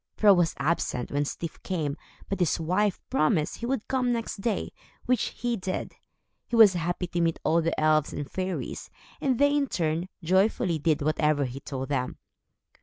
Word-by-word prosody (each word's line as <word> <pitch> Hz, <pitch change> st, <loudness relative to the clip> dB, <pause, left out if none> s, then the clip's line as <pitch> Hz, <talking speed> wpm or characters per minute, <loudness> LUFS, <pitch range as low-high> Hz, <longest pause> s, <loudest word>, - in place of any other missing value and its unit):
Fro 205 Hz, -2 st, +7 dB
was 175 Hz, -3 st, +2 dB
absent, 140 Hz, -4 st, -1 dB
when 145 Hz, +1 st, 0 dB
Styf 165 Hz, +2 st, -6 dB
came, 155 Hz, -7 st, -2 dB, 0.3 s
but 195 Hz, -, -3 dB
his 175 Hz, -1 st, +1 dB
wife 185 Hz, +5 st, +1 dB
promised 155 Hz, 0 st, +1 dB
he 235 Hz, -, -4 dB
would 260 Hz, -4 st, -2 dB
come 255 Hz, -2 st, +1 dB
next 230 Hz, -2 st, -2 dB
day, 215 Hz, -2 st, -1 dB, 0.3 s
which 250 Hz, -3 st, +2 dB, 0.2 s
he 240 Hz, -1 st, +1 dB
did. 185 Hz, -3 st, -4 dB, 0.5 s
He 235 Hz, -, -2 dB
was 220 Hz, -4 st, +8 dB
happy 175 Hz, +1 st, -2 dB
to 175 Hz, 0 st, -2 dB
meet 165 Hz, -1 st, +1 dB
all 170 Hz, +1 st, +3 dB
the 165 Hz, +1 st, -1 dB
elves 155 Hz, -1 st, +3 dB
and 145 Hz, -, -4 dB
fairies, 185 Hz, +2 st, -4 dB, 0.3 s
and 260 Hz, -3 st, +1 dB
they, 285 Hz, +2 st, +4 dB
in 285 Hz, -1 st, +2 dB
turn, 165 Hz, -2 st, -1 dB
joyfully 185 Hz, -1 st, +2 dB
did 150 Hz, -1 st, +1 dB
whatever 150 Hz, -1 st, +2 dB
he 130 Hz, +1 st, -6 dB
told 135 Hz, -1 st, -5 dB
them. 130 Hz, -3 st, -1 dB
175 Hz, 180 wpm, -27 LUFS, 155-210 Hz, 0.5 s, was